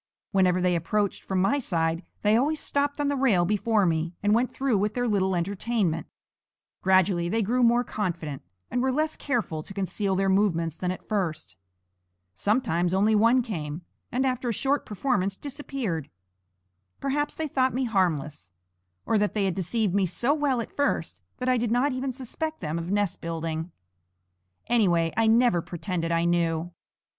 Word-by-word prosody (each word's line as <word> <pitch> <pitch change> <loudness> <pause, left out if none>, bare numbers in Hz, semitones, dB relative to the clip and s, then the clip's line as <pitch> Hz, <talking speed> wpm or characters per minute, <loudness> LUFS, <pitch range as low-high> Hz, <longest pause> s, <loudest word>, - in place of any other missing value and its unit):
Whenever 185 -2 +3
they 180 -1 +2
approached 200 +5 -1
from 190 -1 -2
my 195 +10 +2
side, 165 -6 -1 0.2
they 210 +1 +4
always 295 +6 +2
stopped 285 +1 0
on 290 - +1
the 285 - +1
rail 230 -10 +3
before 210 +1 +2
me 165 0 0
and 205 0 +3
went 240 +3 +2
through 270 -4 0
with 210 +1 -1
their 245 0 0
little 190 -3 +1
entertainment. 185 -2 -1 0.7
Gradually 185 -2 +3
they 225 +3 +1
grew 245 +5 +1
more 240 0 +4
confident, 170 - -3 0.3
and 245 - 0
were 260 +1 +2
less 310 +3 0
careful 225 - -2
to 195 - -11
conceal 195 0 -1
their 195 +1 +1
movements 175 -5 +2
than 180 - -3
at 185 - -5
first. 160 - -2 0.8
Sometimes 180 - +1
only 210 +3 +3
one 230 +4 +4
came, 165 - -5 0.3
and 260 +2 +1
after 255 -1 -1
a - - +2
short 275 +6 0
performance 200 -3 0
disappeared. 265 - -4 0.9
Perhaps 290 +2 -1
they 320 - -2
thought 260 -3 +1
me 260 - 0
harmless, 160 - -1 0.5
or 220 - +2
that 210 +1 0
they 205 -2 +1
had 190 - +1
deceived 190 +2 -1
me 195 -2 +2
so 240 - +1
well 285 -5 +1
at - - -9
first 165 - -1 0.2
that 250 - -4
I 255 0 +3
did 235 0 0
not 250 +5 +2
even 260 +1 -2
suspect 295 +5 -5
them 160 0 -3
of 170 +1 -5
nest 205 -2 0
building. 165 0 -3 0.9
Anyway, 175 -8 +2
I 225 0 +3
never 225 -5 +4
pretended 170 0 -3
I 165 0 +2
knew. 170 0 0
205 Hz, 170 wpm, -26 LUFS, 175-245 Hz, 0.9 s, they